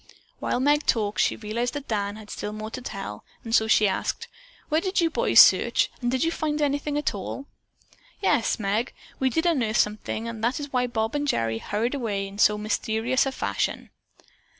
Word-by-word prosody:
While - - -1
Meg 295 +3 +2
talked, 210 -3 +1
she - - +2
realized 230 +4 -3
that 290 -1 -5
Dan 205 -2 -2
had 215 -1 -11
still 210 - -5
more 215 +1 -6
to 255 - -6
tell, 195 - -6 0.2
and 225 - -5
so 220 -1 +4
she 215 -1 +4
asked: 190 - -2 0.4
"Where 310 +2 +1
did 380 +1 0
you 335 -2 +2
boys - - +4
search, - - +6
and 240 - 0
did 260 0 0
you 330 - +1
find 305 -2 -2
anything 290 0 0
at 295 - 0
all?" 205 +7 -6 0.7
"Yes, 290 - +2
Meg, 215 +4 -1 0.3
we 265 - +2
did 320 +7 -1
unearth 245 -10 +1
something 215 +2 -1
and 230 -1 -6
that 245 +6 +1
is 285 -1 -7
why 250 -1 +2
Bob 225 -2 -2
and 290 0 -1
Gerry 115 - 0
hurried 225 - -2
away 210 -7 -2
in 200 +1 -11
so 210 0 +5
mysterious 220 +5 0
a - - -1
fashion." - - -2
230 Hz, 195 wpm, -25 LUFS, 210-285 Hz, 0.7 s, search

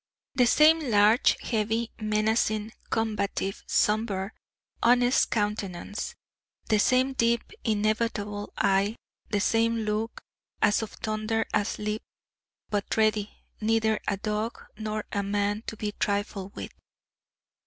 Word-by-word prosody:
The 250 -2 +4
same 310 +6 +6
large, 210 +2 +5
heavy, 225 0 -1
menacing, 215 0 +1 0.2
combative, 210 -3 -1
sombre, 210 -2 +1 0.5
honest 245 +2 +4
countenance, 205 -2 -2 0.5
the 215 -2 +4
same 255 +4 +3
deep 235 -2 +1
inevitable 215 -1 -1
eye, 195 +3 +2 0.3
the 205 - +1
same 230 +2 +2
look 215 +1 -2 0.4
as 205 +1 +3
of 220 - -4
thunder 215 +1 -1
asleep, 210 +1 -1 0.7
but 205 0 -1
ready 215 -1 +2 0.3
neither 220 0 +2
a 200 - 0
dog 215 +3 -2 0.2
nor 215 0 -3
a 200 - 0
man 205 +1 0
to 225 - -5
be 210 0 -2
trifled 200 -1 -2
with. - - -6
215 Hz, 110 wpm, -27 LUFS, 205-225 Hz, 0.7 s, same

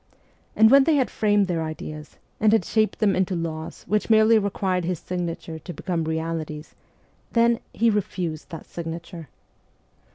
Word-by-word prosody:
And 220 +1 +6
when 275 0 +7
they 320 - +3
had 265 -3 +1
framed 205 -2 +2
their 175 -3 -1
ideas, 155 -1 -7 0.2
and 215 0 +4
had 220 -5 +3
shaped 215 -1 +1
them 210 -3 +2
into 185 0 0
laws 160 -2 -5
which 210 +1 0
merely 220 0 +6
required 190 -3 -1
his 180 +1 -1
signature 170 -2 -5
to 175 +3 -8
become 170 -4 -2
realities, 160 -1 -4 0.6
then 235 0 +3
he 230 0 +2
refused 180 -6 -3
that 165 -3 -8
signature. 165 -1 -7
180 Hz, 155 wpm, -24 LUFS, 165-215 Hz, 0.6 s, when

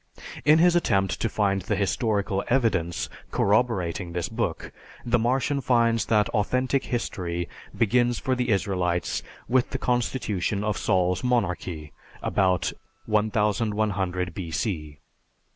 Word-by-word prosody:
In 150 +2 +7
his 175 +1 +5
attempt 95 - +1
to 115 - +1
find 100 -2 +1
the 105 - -1
historical 100 -1 0
evidence 110 -10 +1 0.2
corroborating 100 -5 +1
this 85 -1 -2
book, 110 -7 -3 0.3
the 120 0 +2
Martian 135 +4 +1
finds 115 -4 +2
that 105 -2 +3
authentic 125 +6 0
history 85 -7 -3 0.3
begins 120 +2 +2
for 130 - -1
the 125 -1 -1
Israelites 90 -4 0 0.3
with 125 +1 +2
the - - -3
constitution 105 -5 -1
of 105 -1 0
Saul's 90 +1 +1
monarchy 90 - -1 0.3
about 95 -2 +1 0.3
1100 105 -4 0
B.C. 80 -4 -3
105 Hz, 115 wpm, -25 LUFS, 90-120 Hz, 0.3 s, In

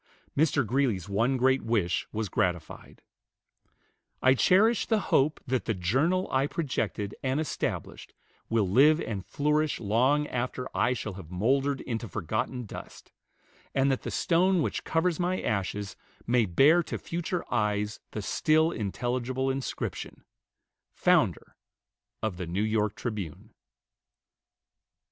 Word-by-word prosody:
Mr. 145 -3 +2
Greeley's 120 -7 0
one 115 +7 +1
great 130 +1 +3
wish 105 -6 0
was 110 0 -2
gratified, 90 -2 -3 1.2
"I 130 - +5
cherish 205 - +4
the 220 -2 +2
hope 150 +3 +3
that 130 -1 -1
the 110 - 0
journal 135 - +1
I 135 +2 +2
projected 110 -10 -2
and 130 +2 0
established 155 - -4 0.3
will 115 -4 +2
live 145 - +5
and 105 - -4
flourish 150 +6 0
long 125 +8 +2
after 125 -1 -3
I 125 - +2
shall 110 -4 -5
have 90 -4 -10
mouldered 135 +9 +1
into 115 -1 -4
forgotten 110 +6 -3
dust; - - -10 0.6
and 135 0 +3
that 130 - -1
the - - -5
stone 180 0 +2
which - - -2
covers 165 +1 0
my 180 +1 0
ashes 100 -1 -2 0.3
may 120 -2 +2
bear 145 - +5
to - - -5
future 175 +1 -3
eyes 105 -2 0
the 105 - -5
still 155 +8 +2
intelligible 125 - -2
inscription, 135 0 -5 0.7
'Founder - - +2 0.7
of 105 -5 -2
the 90 -2 -5
NEW 95 +5 -1
YORK 110 -1 0
TRIBUNE.'" 105 - -5
125 Hz, 130 wpm, -28 LUFS, 105-145 Hz, 1.2 s, I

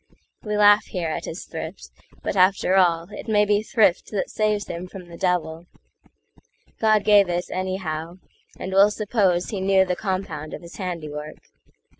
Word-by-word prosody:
We 210 -1 -3
laugh 205 0 +6
here 175 -4 -3
at 155 - -4
his 165 - -7
thrift, - - -8 0.3
but - - -2
after 185 0 +3
allIt 175 +1 +1
may 210 -1 +3
be 205 0 +2
thrift 215 -5 +2
that 200 -3 -3
saves 210 -1 0
him 175 +2 -6
from 180 -1 -11
the 170 - -10
devil; 175 -2 -1 1.1
God 215 -2 +3
gave 205 -3 +5
it, 175 0 -1
anyhow,—and 185 0 -6
we'll 200 +2 +6
supposeHe 200 -3 0
knew 190 0 +4
the 180 -1 -1
compound 175 -6 -4
of - - -12
his 170 - -11
handiwork. 155 -5 -5
185 Hz, 150 wpm, -23 LUFS, 175-205 Hz, 1.1 s, laugh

